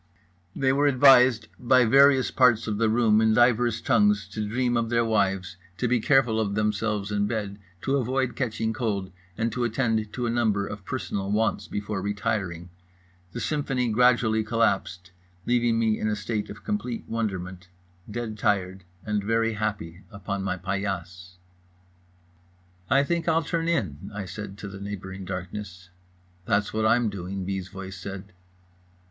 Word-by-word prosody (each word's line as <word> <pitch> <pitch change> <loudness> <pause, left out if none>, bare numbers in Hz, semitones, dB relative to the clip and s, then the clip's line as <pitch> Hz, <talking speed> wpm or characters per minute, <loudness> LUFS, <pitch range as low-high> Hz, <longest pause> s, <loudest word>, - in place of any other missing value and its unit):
They 130 -1 +2
were 145 +1 +3
advised 130 -4 +6
by 125 0 +4
various 135 +2 +5
parts 120 -3 +4
of 105 -2 -2
the 115 -1 +3
room 110 -1 +3
in 110 -1 +3
divers 120 -1 +3
tongues 210 0 +2
to 110 - -4
dream 120 +3 0
of 115 -1 0
their 115 0 +2
wives, 95 -4 0 0.2
to 125 - 0
be 120 0 +2
careful 120 -2 +3
of 100 -2 -1
themselves 105 -1 -1
in 105 0 +1
bed, 105 -3 -4 0.2
to 135 +1 +1
avoid 130 0 -1
catching 110 -3 -2
cold, 100 -6 -2 0.3
and 115 +1 0
to 125 - -2
attend 115 -3 0
to 125 - -2
a 115 - 0
number 110 -4 +1
of 100 -1 -8
personal 100 -6 -3
wants 110 +2 0
before 105 -1 -4
retiring. 95 -4 -3 0.6
The - - -4
symphony 135 -5 -1
gradually 115 -1 +3
collapsed, 100 -5 -1 0.3
leaving 120 -1 +2
me 115 -1 +2
sitting 110 - -2
in - - +1
a - - 0
state 105 -1 -3
of - - -10
complete 200 - -3
wonderment, 95 -5 -4 0.4
dead 110 -1 -5
tired 95 -2 0 0.2
and 105 -2 -1
very 115 +1 +1
happy, 100 -5 -4
upon 100 -1 -5
my 95 -1 -2
paillasse. 90 -1 -4 1.5
"I 140 - +4
think 170 +3 -2
I'll 165 0 +3
turn 165 +1 -2
in" 95 - -2
I 100 -2 -4
said 100 +1 -8
to 100 - -7
the 100 0 -9
neighbouring 95 -1 -6
darkness. 90 -1 -7 0.5
"That's 105 0 0
what 110 0 +1
I'm 115 -1 +3
doing" 95 0 -5
B.'s 95 -1 -3
voice 95 -1 -8
said. 95 +1 -8
110 Hz, 160 wpm, -26 LUFS, 100-120 Hz, 1.5 s, advised